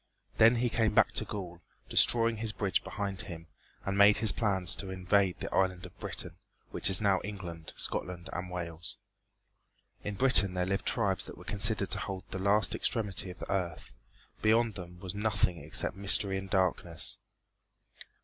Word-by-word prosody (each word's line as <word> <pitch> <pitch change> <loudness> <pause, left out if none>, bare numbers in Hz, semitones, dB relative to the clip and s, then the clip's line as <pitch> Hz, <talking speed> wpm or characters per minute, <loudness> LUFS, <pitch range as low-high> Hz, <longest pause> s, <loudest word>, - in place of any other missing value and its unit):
Then 115 +2 +6
he 120 +1 0
came 110 -1 0
back - - +4
to - - -1
Gaul, 90 -4 -7 0.3
destroying 115 -1 +4
his 110 0 -3
bridge 95 -3 -1
behind 100 -2 -5
him; 85 -3 -9 0.4
and 95 - -2
made 100 +1 +6
his 110 -2 +3
plans 95 -3 0
to 95 - -6
invade 95 0 0
the - - -6
island 95 -2 0
of - - -15
Britain, - - -4 0.3
which - - +4
is 95 0 +7
now 100 -2 +2
England, 90 -6 -8
Scotland 90 -1 -3
and 90 +1 -5
Wales. 85 -2 -6 1.1
In 105 - -5
Britain 105 -6 +6
there 90 0 0
lived 95 +1 -3
tribes - - +1
that - - -11
were - - -12
considered 105 -1 +2
to - - -1
hold 95 -1 -5
the 95 - -5
last 100 -1 +1
extremity 100 -4 -1
of 90 - -10
the - - -5
earth. 90 -4 -4 0.5
Beyond 115 +1 +2
them 90 -2 -10
was 95 -3 -6
nothing 105 -4 -1
except - - 0
mystery 100 0 +4
and 95 0 -9
darkness. 90 -3 -2
95 Hz, 170 wpm, -30 LUFS, 90-105 Hz, 1.1 s, is